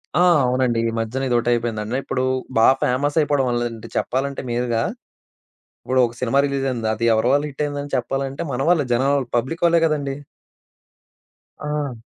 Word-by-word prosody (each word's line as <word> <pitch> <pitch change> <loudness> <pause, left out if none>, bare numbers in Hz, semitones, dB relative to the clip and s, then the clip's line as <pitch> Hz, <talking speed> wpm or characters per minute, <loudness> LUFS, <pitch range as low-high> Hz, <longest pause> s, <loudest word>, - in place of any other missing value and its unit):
ఆ! 175 - +4 0.2
అవునండి. 125 -2 +1
ఈ - - -3
మధ్యన 125 +4 -2
ఇదొకటైపోయిందండి. 120 -1 0
ఇప్పుడు 130 -1 -2 0.3
బాగా 115 +4 +6
ఫేమస్ 145 +5 0
అయిపోవడం 145 -3 +2
వల్ల, 120 0 0
లేదంటే 115 -2 -7
చెప్పాలంటే 135 +2 -1
మీరుగా 120 -1 0 1.0
ఇప్పుడు 130 0 +2
ఒక 120 - -12
సినిమా 130 +2 +1
రిలీజ్ 140 -1 -2
అయింది, 115 -3 -2
అది 115 +2 -2
ఎవరి 110 +2 +1
వల్ల 145 +1 +2
హిట్ 140 - -7
అయింది 145 -1 -4
అని 145 - -9
చెప్పాలంటే, 135 +3 -2
మన 125 - -2
వల్లే 160 -6 +3
జనాల 135 +4 +2
వల్ల 130 -3 -3
పబ్లిక్ 150 +9 -3
వల్లే 170 0 +4
కదండీ! 145 -3 -1 1.5
ఆ! 150 -4 -3
130 Hz, 165 wpm, -21 LUFS, 120-140 Hz, 1.5 s, బాగా